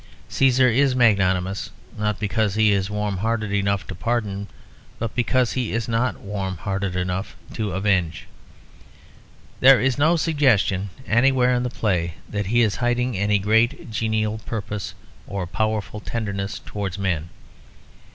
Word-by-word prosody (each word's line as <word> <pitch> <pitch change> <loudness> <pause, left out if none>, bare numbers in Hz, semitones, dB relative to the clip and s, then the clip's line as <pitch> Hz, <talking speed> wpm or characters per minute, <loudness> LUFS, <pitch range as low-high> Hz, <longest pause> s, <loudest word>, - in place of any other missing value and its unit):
Cæsar 130 -3 +4
is 135 -1 +3
magnanimous 95 -5 +2 0.3
not 105 -1 -1
because 105 -1 0
he 110 -1 +4
is 100 -1 +1
warm 105 -1 -2
hearted 110 +1 -1
enough 100 -1 0
to - - -7
pardon, 105 -4 -2 0.5
but 115 -1 -4
because 125 0 +1
he 125 -3 -2
is 115 -1 -1
not 115 +2 0
warm 95 -2 -4
hearted 95 0 -3
enough 90 +2 -3 0.2
to 105 -4 -3
avenge. 95 -4 0 1.3
There 135 0 +7
is 135 +1 +1
no 160 +4 +4
suggestion 130 - +2 0.2
anywhere 125 +1 +3
in 125 - +1
the 125 - -1
play 90 -8 -1
that 105 -2 -3
he 120 +3 +3
is 105 -3 0
hiding 120 0 0
any 100 +2 +2
great 110 +5 +1
genial 110 -1 -1
purpose 105 -3 -5 0.3
or 100 -2 -3
powerful 110 +2 -2
tenderness 100 -3 -4
towards 100 -2 -5
men. 90 -5 -1
105 Hz, 140 wpm, -23 LUFS, 100-120 Hz, 1.3 s, There